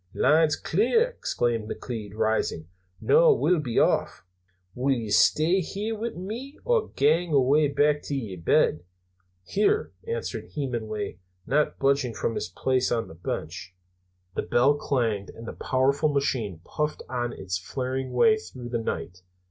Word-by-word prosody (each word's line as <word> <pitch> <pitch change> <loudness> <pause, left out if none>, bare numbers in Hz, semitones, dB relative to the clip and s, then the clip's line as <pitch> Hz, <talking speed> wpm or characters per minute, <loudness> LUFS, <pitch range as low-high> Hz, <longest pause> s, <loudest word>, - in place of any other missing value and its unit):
"Line's 155 0 +4
clear," 245 - +2
exclaimed 120 - -2
McLeod, 110 -5 -6
rising. 110 -7 0 0.3
"Noo 475 -1 +5
we'll 180 - +2
be 125 -6 -3
off! - - +1 0.5
Wull 130 +5 -1
ye 115 -4 -4
stay 165 - +4
here 205 +5 -3
wi' 225 +2 -3
me, 230 +10 -6
or 475 -3 +2
gang 160 +3 +2
awa' 140 +3 +4
back 145 +1 +2
to 145 - -3
yer 110 -9 -4
bed?" 80 0 +2 0.6
"Here," 210 - +1 0.2
answered 465 +1 -4
Hemenway, 110 -9 -3 0.3
not 150 +2 +1
budging 135 -4 +1
from 115 - -1
his 90 - -3
place 130 +7 0
on 115 -1 -1
the - - -10
bench. 90 +2 -6 0.6
The - - -1
bell 130 +4 +3
clanged, 115 -8 -1
and 115 0 -10
the - - -5
powerful 140 +4 +1
machine 120 - -1
puffed 150 0 -3
out 120 -1 -2
on 120 - -4
its 90 -1 -4
flaring 130 +6 -3
way 215 - +4
through 125 - -9
the 120 -1 -1
night. 90 -4 -4
130 Hz, 150 wpm, -26 LUFS, 115-160 Hz, 0.6 s, Noo